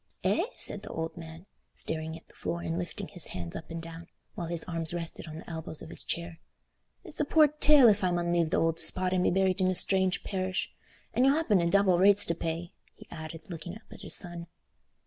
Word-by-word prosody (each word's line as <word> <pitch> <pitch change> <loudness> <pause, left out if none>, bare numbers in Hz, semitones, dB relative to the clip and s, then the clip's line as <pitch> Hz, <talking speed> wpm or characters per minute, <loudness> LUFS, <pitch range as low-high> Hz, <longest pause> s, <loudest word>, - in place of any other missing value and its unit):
"Eh," - - +2
said - - +2
the - - -10
old 160 0 -4
man, 165 0 -10 0.3
staring 160 0 -4
at 165 - -19
the - - -22
floor 85 -1 -4
and 85 +1 -2
lifting 90 - -5
his - - 0
hands 85 -2 -6
up - - -8
and 165 0 -6
down, 165 0 -10 0.3
while 170 - -5
his 170 -1 0
arms 165 -1 -1
rested 165 -1 -5
on 155 0 -8
the 165 - -11
elbows 160 -2 -6
of 165 - -10
his - - -8
chair, 170 -1 -4 0.6
"it's 340 -6 -6
a - - +3
poor 305 +1 +5
tale 300 -3 +5
if 205 -2 +3
I 185 - +3
mun 175 -1 0
leave 170 -2 +2
th' - - 0
ould 165 0 +1
spot 185 +3 +3
an 185 - +2
be - - +3
buried 190 0 +1
in 185 - +3
a 185 - +1
strange 190 0 +2
parish. 185 -1 -3 0.4
An' 250 - +2
you'll 275 +2 +5
happen 270 - +2
ha' 170 0 +1
double 190 -2 +4
rates 200 +1 +6
to 170 - +1
pay," 165 +1 -4 0.2
he - - -15
added, 160 0 -8
looking 175 +1 -7
up 220 - -13
at - - -12
his - - +5
son. 175 -2 0
170 Hz, 235 wpm, -29 LUFS, 165-190 Hz, 0.6 s, rates